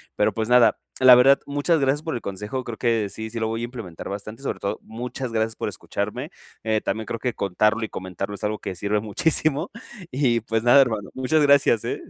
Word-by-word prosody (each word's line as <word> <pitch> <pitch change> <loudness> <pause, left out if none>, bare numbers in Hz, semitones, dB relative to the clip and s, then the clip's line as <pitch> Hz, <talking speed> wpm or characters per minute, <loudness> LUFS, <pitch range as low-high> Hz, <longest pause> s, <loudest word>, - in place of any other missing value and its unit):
Pero, - - +2
pues, 110 -1 -2
nada, 125 -1 +5 0.2
la 130 -1 +10
verdad, 135 +3 +6
muchas 145 +4 +1
gracias 135 +3 +1
por 160 -4 -3
el 120 - -4
consejo, 105 +7 -5
creo 115 -2 -7
que 115 -4 0
sí, 110 +3 -5
sí 115 +1 -5
lo 110 - 0
voy 115 +1 -3
a - - -3
implementar 115 -9 -8
bastante, 105 +6 -7
sobre - - -3
todo 100 - -3
muchas 120 +2 -6
gracias 110 0 0
por - - -3
escucharme. - - -4 0.3
Eh, 110 -1 +1
también 110 0 -3
creo 115 - -4
que 125 0 -2
contarlo 105 +4 +1
y 110 - -3
comentarlo 95 +2 -5
es - - -13
algo 105 0 -1
que 95 - -5
sirve 100 +4 -3
muchísimo, 145 +7 0 0.4
y, 125 -3 +2
pues, 115 0 -1
nada, 120 +3 +7
hermano, 110 -6 -1
muchas 130 +4 +1
gracias, 140 -6 +4
eh. - - -3
115 Hz, 220 wpm, -23 LUFS, 105-130 Hz, 0.4 s, la